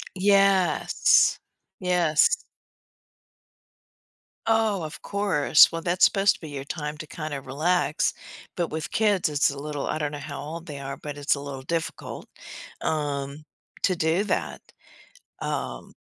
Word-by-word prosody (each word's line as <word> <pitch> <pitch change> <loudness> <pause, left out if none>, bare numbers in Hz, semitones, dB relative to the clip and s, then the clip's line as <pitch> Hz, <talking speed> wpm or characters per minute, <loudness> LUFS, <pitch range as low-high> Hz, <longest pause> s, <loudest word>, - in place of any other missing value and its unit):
Yes. 195 -1 +4 0.4
Yes. 180 - +2 2.0
Oh, 220 -4 +2
of 155 - -8
course, 195 -7 +4
well 165 0 -4
that's 175 +1 +3
supposed 200 0 +4
to - - -25
be 160 - -8
your 140 -1 -6
time 150 0 -5
to 155 - -7
kinda 155 -3 -5
relax, 155 +5 0 0.4
but 175 -2 0
with 155 0 -5
kids 205 -6 +2
it's 145 -1 +2
a 140 - -7
little 145 0 -4
I 155 - -1
don't 150 -1 -2
know 145 - -5
how 145 0 -7
old 165 +3 -7
they 145 -3 -7
are, 140 0 -6
but 145 -1 -7
it's 145 0 +2
a 140 - -5
little 140 -2 -7
difficult, 165 +4 -4 0.5
um, 145 -1 -2 0.4
to 185 - +2
do 165 +4 +1
that, - - -2 0.8
um - - -4
155 Hz, 140 wpm, -25 LUFS, 145-180 Hz, 2.0 s, Yes